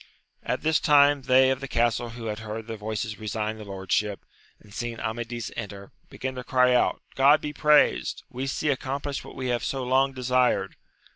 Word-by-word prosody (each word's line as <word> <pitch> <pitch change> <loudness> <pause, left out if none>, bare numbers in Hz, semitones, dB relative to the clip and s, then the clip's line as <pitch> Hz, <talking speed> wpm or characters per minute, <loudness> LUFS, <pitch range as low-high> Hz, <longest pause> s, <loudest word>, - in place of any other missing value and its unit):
At - - -3
this 160 0 +3
time 145 -2 +5
they 130 0 +4
of 130 - -1
the 135 - -6
castle 120 -1 0
who 115 0 -8
had 105 -1 -3
heard 110 0 -6
the 115 0 -6
voices 110 0 -4
resign 110 0 -3
the - - -7
lordship, 100 +1 -2 0.3
and 100 - -18
seen 120 0 -4
Amadifi 120 +1 -4
enter, 100 0 -7 0.2
began 130 0 -5
to 125 -1 -6
cry 125 0 +3
out, 125 - +1
God 140 +3 +5
be 150 - -5
praised, 150 0 +3
we 130 0 -5
see 150 +2 -1
accomplished 140 +1 -3
what - - -12
we 130 -1 -3
have 120 -1 -1
so 135 -1 -2
long 135 +2 +2
desired. 125 -1 +1
125 Hz, 190 wpm, -26 LUFS, 110-135 Hz, 0.3 s, time